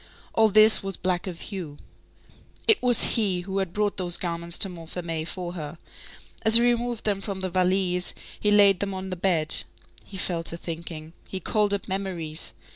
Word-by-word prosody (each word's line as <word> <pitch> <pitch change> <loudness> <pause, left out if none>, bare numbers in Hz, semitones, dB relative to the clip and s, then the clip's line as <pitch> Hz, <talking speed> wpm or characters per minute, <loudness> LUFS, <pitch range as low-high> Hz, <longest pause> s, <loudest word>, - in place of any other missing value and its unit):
All 220 -1 +4
this 215 +1 +7
was 195 -1 -4
black 185 0 -2
of 175 -2 -6
hue. 175 -8 -7 0.9
It 445 - +4
was 245 -1 +5
he 195 -6 0
who 190 +2 -4
had 190 -3 -2
brought 210 +1 -1
those 175 -2 +2
garments 170 -1 0
to - - +1
Montfermeil 165 -2 -6
for 175 -1 -5
her. 160 -2 -7 0.6
As 220 0 +3
he 235 - +9
removed 240 -1 0
them 200 -2 -1
from 195 -1 -5
the 185 -1 -3
valise, 180 0 +1 0.2
he 210 - 0
laid 200 -2 +5
them 195 -1 -3
on 190 0 -6
the - - -2
bed. 170 -4 +2 0.5
He 195 - -10
fell 175 -2 -1
to 170 - -2
thinking. 165 -1 -7
He 190 - -5
called 210 +3 0
up 200 -2 -3
memories. 180 -5 -3
185 Hz, 185 wpm, -25 LUFS, 170-200 Hz, 0.9 s, he